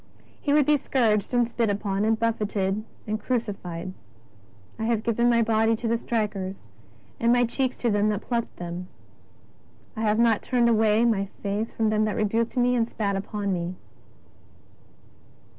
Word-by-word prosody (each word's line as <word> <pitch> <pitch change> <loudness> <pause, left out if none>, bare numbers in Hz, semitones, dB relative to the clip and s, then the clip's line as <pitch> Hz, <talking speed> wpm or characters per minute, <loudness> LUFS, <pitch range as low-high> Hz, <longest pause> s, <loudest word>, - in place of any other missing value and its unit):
t - - -28 0.2
He 285 - 0
would 295 -1 +5
be 300 +1 +4
scourged 225 -7 +1
and 245 -2 +3
spit 235 -2 0
upon, 200 0 -1
and 220 0 +2
buffeted, 210 -3 -1 0.2
and 215 0 -2
crucified: 195 -7 -3 0.4
'' 100 0 -28
I 220 - -1
have 225 -2 0
given 235 +1 +2
my 235 -1 +4
body 225 0 +2
to 230 +1 -4
the 230 - +2
strikers 200 - -3 0.5
and 230 0 +3
my 245 0 +4
cheeks 255 +2 -1
to 235 - +3
them 205 +1 +2
that 210 -1 -1
plucked 235 -2 -2
them; 175 +1 -6 1.1
I 220 - -4
have 215 -1 +2
not 230 -2 +3
turned 240 -2 +2
away 220 0 +3
my 200 -4 +1 0.2
face 205 +2 -2
from 220 -1 0
them 215 0 +2
that 215 - -1
rebuked 225 +4 0
me 250 0 +3
and 230 -1 +1
spat 200 -2 -1
upon 200 0 -2
me." 175 0 -3
220 Hz, 175 wpm, -25 LUFS, 200-235 Hz, 1.1 s, would